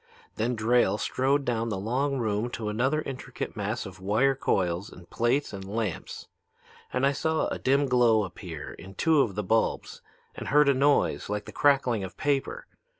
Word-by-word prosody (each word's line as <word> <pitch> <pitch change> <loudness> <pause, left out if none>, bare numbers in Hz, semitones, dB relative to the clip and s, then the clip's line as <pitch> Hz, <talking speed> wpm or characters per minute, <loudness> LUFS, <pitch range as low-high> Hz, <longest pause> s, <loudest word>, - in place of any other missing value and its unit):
"Then 120 +3 0
Drayle 110 -2 +2
strode 135 +5 0
down 115 -1 -1
the 105 - -2
long 130 +8 -1
room 110 -1 -1
to 110 -2 -3
another 130 +8 0
intricate 130 -2 -6
mass 105 +3 -3
of 95 -1 -10
wire 110 +8 +2
coils 95 -7 -1
and 90 -2 -14
plates 120 +4 0
and 95 -1 -6
lamps. 105 -2 -4 0.6
And 125 +1 +1
I 140 - +4
saw 160 +3 0
a - - -4
dim 140 +2 +2
glow 120 -4 +4
appear 85 -5 -7
in 95 +2 -12
two 160 - +3
of 105 -8 -1
the 105 - -2
bulbs 110 +4 0 0.3
and - - -7
heard 150 0 +5
a - - +5
noise 140 -3 +2
like 105 0 -3
the - - -9
crackling 135 -7 +2
of 95 - -8
paper. 145 - -1
120 Hz, 180 wpm, -27 LUFS, 105-135 Hz, 0.6 s, heard